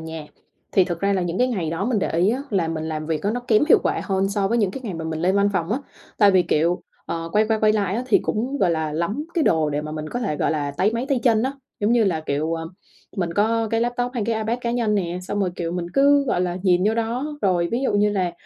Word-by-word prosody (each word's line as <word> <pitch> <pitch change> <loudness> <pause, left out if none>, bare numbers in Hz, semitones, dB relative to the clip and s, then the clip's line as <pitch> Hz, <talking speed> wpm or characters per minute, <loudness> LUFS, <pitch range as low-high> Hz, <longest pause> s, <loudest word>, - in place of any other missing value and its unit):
nhà, 160 -1 -7 0.5
thì 190 - +5
thực 175 -2 -4
ra 200 0 +2
là 185 -2 +1
những 175 +1 -2
cái 250 +1 +3
ngày 180 -10 -2
đó 165 +4 -2
mình 235 -3 +1
để - - -1
ý 175 +5 +2
á 260 +4 -2
là 180 -6 +1
mình 160 -1 -3
làm 155 -1 -4
việc 160 -2 -2
á 205 - +1
nó 245 +2 -2
kém 215 +2 +4
hiệu - - +7
quả - - 0
hơn 195 -1 0
so 200 -1 0
với 235 +2 +1
những 205 -4 +2
cái 265 - -7
ngày 200 - -4
mà 165 -1 -5
mình 160 -1 -3
lên 185 +3 +2
văn 200 0 +3
phòng 180 +2 -1
á. 255 - 0 0.4
Tại 205 -2 +6
vì, 185 -2 +4
kiểu, 170 +2 +1 0.2
ờ, 165 0 -4
quay 215 +1 +3
qua 220 -1 +2
quay 215 0 +4
lại 200 -3 0
á 245 - -1
thì 230 - +4
cũng, 255 +6 -2
gọi 185 - +3
là, 160 -2 -1
lắm 200 - -2
cái 330 - +2
đồ 155 -2 +2
để 145 +1 -2
mà 155 0 -6
mình 155 0 -5
có 245 - -4
thể, 195 -11 -1
gọi - - 0
là, 145 -3 -1
táy 190 +10 +1
máy 235 +3 -2
tay 270 -3 +2
chân 225 -3 +3
á. 265 +2 -1 0.3
Giống 210 +3 +2
như 235 -3 +4
là, 170 -5 0
kiểu, 155 +2 -1
à, 165 - -4 0.5
mình 175 -3 -1
có 225 +2 +1
cái 225 0 +1
laptop 245 +1 -1
hay 230 - -1
cái 230 - +1
iPad 220 +3 -1
cá 235 - -2
nhân 235 -3 0
nè, 180 -3 -1
xong 205 +2 -3
rồi, 185 - +1
kiểu, 170 -1 -3
mình 175 -1 -3
cứ, 280 +1 +5
gọi 180 - 0
là, 180 -1 -1
nhìn 180 -1 +3
vô 220 - +2
đó. 245 +6 -2
Rồi, 175 -3 +2
ví 245 - 0
dụ 265 - +1
như 205 0 +3
là 185 -4 -1
195 Hz, 300 wpm, -22 LUFS, 170-230 Hz, 0.5 s, hiệu